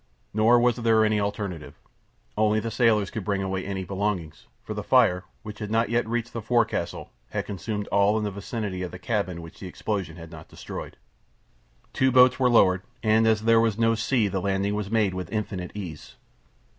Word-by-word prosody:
Nor 110 +3 +5
was 120 0 +2
there 115 -2 +3
other 105 0 +2
alternative. 100 -5 -4 0.6
Only 110 0 +2
the 115 +1 -4
sailors 110 -4 +2
could 110 - -4
bring 100 0 -1
away 95 -1 -2
any 95 -1 -4
belongings, 95 -5 -3 0.2
for 105 - -5
the 105 - -4
fire, 105 -6 +3 0.2
which 105 -1 -8
had 105 - -5
not 115 0 +1
yet 120 -1 +1
reached 120 +1 -2
the 115 - -4
forecastle, 120 +2 -1 0.2
had - - -3
consumed 105 +1 -4
all 100 +2 +3
in 110 - -1
the 105 - -2
vicinity 100 -1 -4
of 90 - -3
the 90 - -9
cabin 90 -4 -2
which 80 - -12
the 95 - -7
explosion 95 -3 -4
had 85 -1 -10
not 80 -2 -11
destroyed. - - -8 1.0
Two 130 0 +2
boats 125 +1 +6
were 130 -1 +4
lowered, 95 -6 +4 0.2
and 110 0 +4
as 110 -1 +3
there 115 0 +5
was 115 -2 +1
no 115 0 +3
sea 115 0 +1
the 95 -1 -2
landing 100 +1 0
was 105 -1 -3
made 105 -4 +1
with 90 -1 -5
infinite 100 -4 -3
ease. 80 -10 -8
105 Hz, 195 wpm, -25 LUFS, 95-115 Hz, 1.0 s, boats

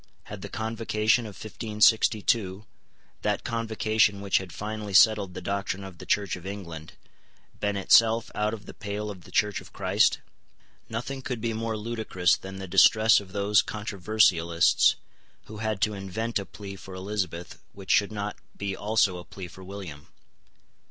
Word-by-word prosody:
Had - - -9
the - - -7
Convocation 110 +1 0
of 105 - -10
1562, 110 -1 +1 0.6
that - - -1
Convocation 110 -2 +1
which 100 -1 +2
had 95 -2 -8
finally 105 -1 -5
settled 100 -3 +5
the - - -6
doctrine 100 0 -2
of 95 -3 -10
the - - -10
Church 100 -2 +1
of 90 - -11
England, 90 -5 -7 0.7
been 105 -1 -1
itself 115 +3 +4
out 105 0 0
of 105 -2 -7
the - - -10
pale 105 +1 -4
of 95 -4 -12
the - - -14
Church 105 -2 +1
of - - -15
Christ? - - +2 0.7
Nothing 125 +4 -4
could 125 -2 -4
be 115 0 -2
more 110 0 -2
ludicrous 105 -5 +1
than 95 0 -9
the 95 0 -6
distress 110 +4 +6
of 100 -2 -12
those 100 +1 +3
controversialists 95 -5 +2 0.5
who 110 - -10
had 110 -2 -2
to 105 - +2
invent 105 +4 -3
a 100 - -7
plea 100 -2 -9
for 95 -1 -10
Elizabeth 95 -3 -4
which 95 -1 -5
should 100 0 +3
not 105 -1 -4 0.2
be 100 -1 -3
also 100 -3 +1
a - - -9
plea 95 0 -9
for 95 +2 -13
William. 90 -7 -9
105 Hz, 165 wpm, -27 LUFS, 95-110 Hz, 0.7 s, distress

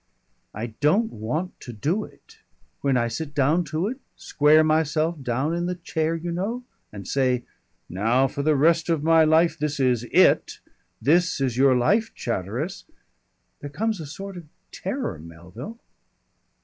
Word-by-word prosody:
"I 110 +3 -3 0.2
don't 195 +10 +2
want 140 - -4
to 125 - -9
do 155 - -1
it. - - -19 0.4
When 135 -2 +1
I 120 -1 +1
sit 150 +4 -5
down 150 +5 +3
to 155 +4 -2
it, 255 +4 -5 0.2
square 150 +2 +4
myself 155 0 +1
down 130 +5 -1
in 175 +1 -1
the 180 - -2
chair, 165 -2 -2
you 170 +1 -4
know, 210 +9 -3 0.3
and 100 -3 -9
say, 130 -3 +1 0.4
now 115 +8 +2
for 140 - -4
the 155 +1 +2
rest 165 +4 +3
of 160 -3 +1
my 165 0 +5
life 160 +1 +3
this 150 -1 -2
is 125 -3 +2
IT - - +3 0.4
this 175 +3 +2
is 130 -4 0
your 130 0 +4
life, 205 - +1
Chatteris; 120 - -4 0.7
there 145 - -7
comes 215 +7 -2
a 155 - -6
sort 195 +5 -8
of 170 - -9 0.3
terror, - - -4
Melville." 90 - -10
155 Hz, 160 wpm, -24 LUFS, 130-170 Hz, 0.7 s, my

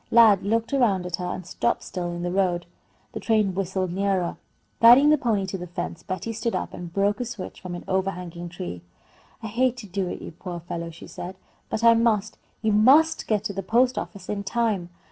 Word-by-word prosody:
Lad 220 -4 +7
looked 225 +5 0
around 210 -9 +2
at 180 -1 -2
her 180 - -4
and 185 0 -5
stopped 235 +6 -1
still 175 -2 -4
in 175 0 -4
the 175 - -1
road. 180 -2 +1 0.5
The - - -5
train 215 -4 +2
whistled 185 -1 -2
nearer. 190 -2 0 0.4
Guiding 250 +6 +8
the 305 - +5
pony 215 -6 +1
to 190 0 -5
the 180 - -6
fence, 175 -1 -5
Betty 185 +6 -4
stood 225 +1 -2
up - - -3
and 175 -1 -7
broke 200 +3 +1
a 245 - -1
switch 220 -5 -7
from 180 -1 -6
an 175 - -7
overhanging 180 -2 -2
tree. 175 - -6 0.6
"I - - -3
hate 250 +3 +1
to 240 - -8
do 190 -1 -2
it, - - -5
you - - -8
poor 175 +2 -8
old 170 -1 -7
fellow," 170 -1 -5
she 165 - -11
said, 185 +2 -7 0.3
"but 220 - -2
I 230 0 +8
must. 225 -2 +1 0.2
You 220 - +2
must 280 +10 +5
get 215 -2 +1
to 210 - -3
the 195 - -3
post 245 +6 +2
office 195 -3 -6
in 200 -1 -3
time." 210 -4 0
195 Hz, 220 wpm, -25 LUFS, 180-225 Hz, 0.6 s, Guiding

